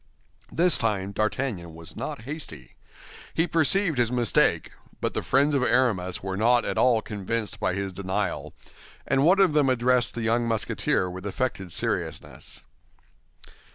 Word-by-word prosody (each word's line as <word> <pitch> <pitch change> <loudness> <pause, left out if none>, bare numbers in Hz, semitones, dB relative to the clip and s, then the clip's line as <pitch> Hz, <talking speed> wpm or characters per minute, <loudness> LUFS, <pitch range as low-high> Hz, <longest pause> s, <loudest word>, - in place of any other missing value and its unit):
This 175 0 +4
time 100 -4 -1
D'Artagnan 110 -5 -2
was 80 0 -10
not - - -5
hasty. 125 - -7 0.6
He 165 - +2
perceived 165 -1 +3
his 120 -1 +2
mistake; 120 -6 +2 0.3
but - - -2
the - - -1
friends 140 +3 +2
of 140 - +2
Aramis 115 -9 +1
were 95 -1 -3
not 120 +3 +3
at - - -2
all 120 -3 +3
convinced 105 +1 -4
by 95 -3 0
his 100 -1 -3
denial, 95 +1 -3 0.5
and 135 - +2
one 185 +5 +5
of 190 -6 +4
them 145 -3 +3
addressed 125 0 +2
the 115 - -3
young 115 +1 +1
Musketeer 110 -4 0
with 95 +2 -6
affected 100 -4 -3
seriousness. - - -3
115 Hz, 150 wpm, -26 LUFS, 95-130 Hz, 0.6 s, one